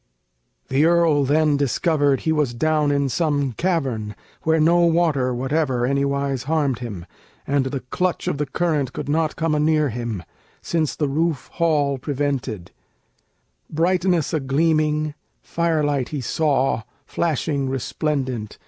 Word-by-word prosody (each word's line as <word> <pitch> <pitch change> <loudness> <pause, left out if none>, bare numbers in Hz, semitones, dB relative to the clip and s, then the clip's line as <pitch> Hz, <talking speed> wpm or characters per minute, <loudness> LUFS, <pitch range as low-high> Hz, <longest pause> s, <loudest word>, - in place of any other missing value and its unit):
] - - -48
The 135 +3 +2
earl 165 -4 +3
then 150 +1 +3
discovered 145 0 +1
he 160 - 0
was 150 -6 0
down 155 +2 +1
in 140 -1 +1
some 145 0 0
cavern 125 - -2 0.3
Where 160 0 +2
no 170 +3 +4
water 165 -6 +2
whatever 130 0 0
anywise 140 -1 0
harmed 145 -5 0
him, 105 -8 -6 0.4
And 140 -1 +1
the 130 0 -3
clutch 180 +8 -2
of 140 - -1
the 150 - -1
current 145 -2 -1
could - - -5
come 145 - -3
not 155 0 0
anear 155 -2 +2
him, 115 -5 -4 0.4
Since 160 -3 -1
the 150 - 0
roofed 155 0 -1
hall 145 -5 +1
prevented; 130 - -3 1.0
brightness 175 0 +1
a 160 - +2
gleaming, 155 +2 +1 0.3
Fire 165 -2 0
light 140 -4 0
he 150 - -3
saw, 135 -1 +1 0.2
flashing 145 -4 -1
resplendent. 130 -4 -2
145 Hz, 140 wpm, -22 LUFS, 130-160 Hz, 1.0 s, no